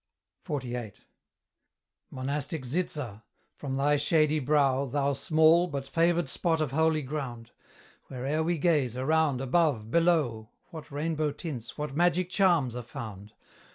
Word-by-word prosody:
XLVIII. 125 -6 -4 1.2
Monastic 140 +3 -3
Zitza! 130 - -3 0.3
from 135 -2 -4
thy 145 +2 +3
shady 155 +1 +2
brow, 140 -1 +2
Thou 140 +2 0
small, 160 +4 +4
but 140 -4 -5
favoured 170 +3 +2
spot 165 +3 0
of 155 -5 -1
holy 160 +1 +2
ground! 125 -5 -5 0.6
Where'er 135 +4 -2
we 170 +1 0
gaze, 145 -7 +1
around, 145 0 +1
above, 135 -5 +1
below, 150 -11 +2 0.2
What 160 -2 -9
rainbow 155 +1 -1
tints, 140 -8 -7
what 150 -2 -4
magic 175 +2 +2
charms 170 - +2
are 125 - -4
found! 105 -3 -9
145 Hz, 125 wpm, -28 LUFS, 130-160 Hz, 1.2 s, small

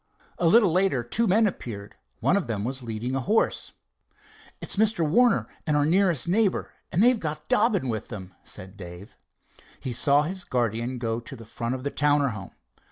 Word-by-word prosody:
A 175 - +3
little 200 +1 +5
later 180 -8 +2
two 225 - 0
men 215 +4 +4
appeared. 105 - -5 0.3
One - - +3
of 200 -8 0
them 105 -3 -2
was 130 +3 -3
leading 115 +2 -4
a 135 - 0
horse. 210 - 0 0.9
"It's - - 0
Mr. 205 -6 +2
Warner 240 +10 +3 0.2
and 150 -1 +2
our 145 - +3
nearest 175 -2 +2
neighbor, 200 +2 +1 0.2
and 185 - +3
they've 245 -1 +5
got 155 -4 -3
old - - -35
Dobbin 210 - +2
with 110 -3 -3
them," 95 -5 -8
said 95 +2 -10
Dave. 90 +2 -10 0.6
He 125 - -4
saw 140 +4 +4
his 185 +4 -4
guardian 120 -3 -1
go 115 -1 -2
to 120 +3 -9
the 115 -2 -12
front 115 +2 -3
of 130 - -7
the 140 - -2
Towner 145 -1 +2
home. 95 -4 -8
140 Hz, 190 wpm, -26 LUFS, 115-185 Hz, 0.9 s, little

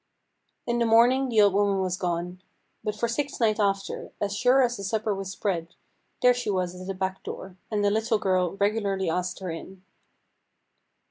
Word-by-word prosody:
In 240 0 0
the 235 - +2
morning 245 +4 +5
the 220 -3 +4
old 200 -2 +5
woman 200 0 +2
was 185 -1 0
gone; 180 0 -3 0.4
but 210 -1 -2
for 235 +2 0
six 280 +4 -3
nights 220 -2 +2
after, 195 -1 -1
as 200 -1 -1
sure 250 +5 +4
as 245 -1 +1
the 200 - -7
supper 215 +1 -1
was 195 -1 -5
spread, 175 -4 -3 0.5
there 250 - +8
was 245 - 0
she 245 - -3 0.3
at 185 - -8
the 195 - -3
back 190 0 -3
door, 190 -1 -8
and 210 -2 0
the 200 - +3
little 220 +1 +1
girl 185 -3 +1
regularly 200 -3 0
asked 180 +1 -2
her 185 -2 -3
in. 185 +3 -9
200 Hz, 190 wpm, -26 LUFS, 185-225 Hz, 0.5 s, there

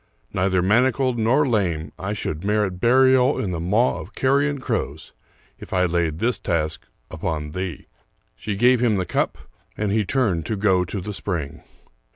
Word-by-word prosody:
Neither 95 -1 +1
manacled 125 +4 +2
nor 130 +7 +3
lame, 85 - 0
I 100 +2 -3
should 80 -5 -4
merit 105 -3 0
burial 130 +3 +4
in 95 - -2
the 85 - -3
maw 105 +9 +1
of - - -11
carrion 140 +2 +2
crows 90 - -4 0.5
if - - -9
I 90 -1 +3
laid 85 -3 0
this 120 +7 0
task 80 -1 -2 0.2
upon 75 -2 -3
thee." 90 -4 -5 0.5
She 105 -2 -4
gave 120 +3 +4
him 115 -4 +3
the 95 -2 -1
cup, - - -1 0.4
and 105 -2 -1
he 110 +1 +2
turned 100 -8 0
to 110 - -1
go 95 -3 +2
to 95 +2 -5
the 105 +3 -5
spring. 85 -8 -4
100 Hz, 170 wpm, -22 LUFS, 90-120 Hz, 0.5 s, burial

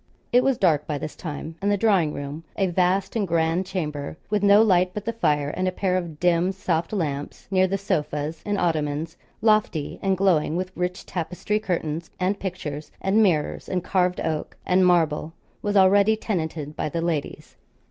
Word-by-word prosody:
It 250 +1 +6
was 270 -2 +2
dark 155 -6 +2
by 150 - -1
this 155 +2 -6
time, 160 0 -6
and 200 +1 +1
the 205 - +2
drawing 190 -7 +3
room, 145 +2 -6
a 195 - +2
vast 185 +2 +1
and 210 -4 0
grand 165 +2 +1
chamber, 150 -6 -4
with 210 -1 +2
no 205 +1 +6
light 180 -3 +3
but 210 - -4
the 230 - -1
fire 150 -10 +1
and 185 +3 -1
a - - +1
pair 185 0 0
of 170 -5 -3
dim 175 +1 +3
soft 170 -4 -1
lamps 145 -8 -3
near 185 -1 +4
the 195 +1 -1
sofas 155 -5 -2
and 205 -1 -1
ottomans, 160 -1 -1 0.3
lofty, 215 -9 +1
and 195 -1 +1
glowing 175 -5 +2
with 185 +1 -2
rich 180 +1 -3
tapestry 180 +4 -2
curtains 165 -5 -3
and 190 +2 0
pictures, 160 -6 -5
and 195 +3 +2
mirrors, 170 -8 +1
and 180 -2 -1
carved 180 -1 +1
oak, 155 -1 -3
and 185 0 +4
marble 165 -2 +2 0.3
was 205 0 0
already 200 +3 +5
tenanted 160 -8 -3
by - - -2
the 165 - -3
ladies. 165 -4 -3
180 Hz, 185 wpm, -24 LUFS, 155-195 Hz, 0.3 s, It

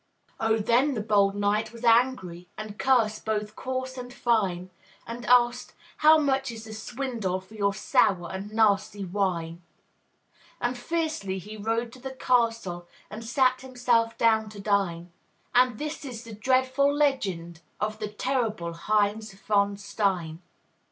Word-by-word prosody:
Oh, 225 0 +2
then 245 +6 +2
the - - -2
bold 200 -2 +3
knight 205 +2 0
was 230 0 -12
angry, 230 -8 +2
And 215 -1 -7
cursed 230 -5 +2
both 210 -1 -2
coarse 260 0 -4
and 245 0 -7
fine; 195 -7 0 0.3
And 235 -1 -7
asked, 245 0 +3 0.2
"How 310 +1 +7
much 270 -3 +1
is 225 -1 -8
the 220 -1 -9
swindle 225 -4 -3
For 190 +3 -18
your 200 -2 0
sour 190 -7 +2
and 195 +2 -6
nasty 205 -2 +2
wine?" 175 -3 -2 1.0
And 245 +1 -1
fiercely 310 - -2
he 210 +4 -8
rode 225 +2 -2
to 255 - -12
the 265 +1 -7
castle 225 -9 0 0.2
And 215 +2 -7
sat 255 +2 +2
himself 245 -3 +1
down 220 -1 +3
to 210 -1 -11
dine; 190 -4 0 0.4
And 250 -2 +4
this 305 +3 -5
is 245 -4 -7
the 230 -2 -10
dreadful 260 +5 +2
legend 195 - -1 0.2
Of 215 +1 -2
the 210 - -2
terrible 215 -6 -2
Heinz 210 +4 0
von 200 0 +1
Stein. 195 -5 -2
220 Hz, 145 wpm, -27 LUFS, 200-250 Hz, 1.0 s, How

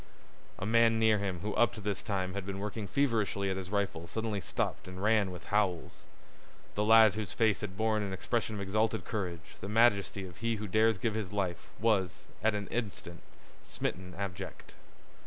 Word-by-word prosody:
A - - -4
man 115 +1 +4
near 110 -1 +4
him 95 -4 -3
who 105 +2 -2
up 120 - +3
to - - -7
this 100 -2 -2
time 95 -3 -2
had 100 0 -3
been 95 0 -5
working 105 +1 -4
feverishly 110 -6 +1
at - - -1
his 95 -1 -5
rifle 100 -5 -1
suddenly 110 -1 -2
stopped - - -2
and 90 +1 -7
ran 105 -2 +3
with 90 -2 -8
howls. 95 -5 0 0.7
A 105 - 0
lad 110 -1 +7
whose 105 -3 -4
face 110 -5 +2
had 95 -3 -5
borne 110 -1 +1
an 100 -2 -3
expression 110 +3 -1
of 100 - -4
exalted 110 +3 0
courage, 90 -7 -4
the 100 - -6
majesty 105 -3 +3
of 90 -1 -11
he 115 0 0
who 105 0 -5
dares 110 +2 +3
give 110 +2 -1
his 105 -4 -3
life, 95 -4 -2
was, 100 -5 +1 0.2
at 110 -1 +3
an 100 -1 -3
instant, 100 -7 -4 0.4
smitten 90 -1 -4
abject. 95 -3 -6
105 Hz, 190 wpm, -31 LUFS, 95-110 Hz, 0.7 s, lad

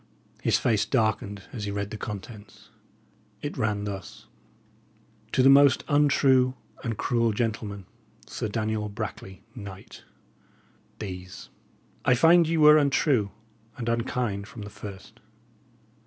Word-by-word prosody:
His - - +3
face 110 -4 +2
darkened 110 -5 -1
as 110 -5 -4
he - - -3
read 100 +1 -3
the - - -5
contents. 105 0 -9 0.7
It - - -4
ran 105 -1 -1
thus: 100 -3 -7 1.1
To 130 - +3
the - - +7
most 140 0 +6
untrue 135 -3 +3 0.3
and 115 -4 -3
cruel 115 -2 +1
gentylman, 105 -3 -3 0.4
Sir - - -4
Daniel 110 0 -2
Brackley, 95 -1 -7
Knyght, 100 -4 -10 1.0
These: 90 -3 -8 0.5
I 130 - +4
fynde 165 +5 +5
ye 165 0 0
were 150 0 +8
untrue 140 -6 +2 0.5
and 120 -3 -5
unkynd 115 -3 -1
fro 105 - -9
the 105 - -9
first. 105 +3 -10
110 Hz, 125 wpm, -26 LUFS, 100-130 Hz, 1.1 s, were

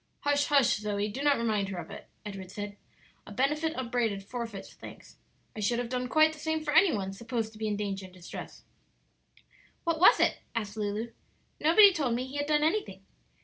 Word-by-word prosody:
"Hush, 285 0 +2
hush, 275 -6 +4
Zoe; 205 0 -2
do 255 +7 -5
not 285 -1 +3
remind 215 -4 0
her 190 - -5
of 170 -2 -7
it," - - -10 0.2
Edward 195 -3 -7
said. 205 +1 -6 0.5
"'A - - -9
benefit 300 +7 0
upbraided 235 -5 -1
forfeits 230 -2 -6
thanks.' - - -13 0.4
I - - -6
should 215 +3 +1
have 240 -1 -3
done 250 0 -2
quite 310 +2 +4
the 310 - -12
same 315 0 -2
for 295 -1 -2
any 330 +3 +6
one 195 -2 -3
supposed 230 +1 -3
to 215 - -14
be 220 - -1
in 205 -1 -1
danger 200 -2 -3
and 185 - -14
distress." 180 -1 -9 1.2
"What 335 -2 0
was 365 - +7
it?" - - +2 0.2
asked 210 -2 -3
Lulu; 215 +2 -3 0.5
"nobody 385 +6 +7
told 270 -8 0
me 250 +2 -2
he 265 +2 -7
had 290 0 -1
done 300 0 +2
anything." 375 +7 -1
235 Hz, 200 wpm, -29 LUFS, 205-295 Hz, 1.2 s, was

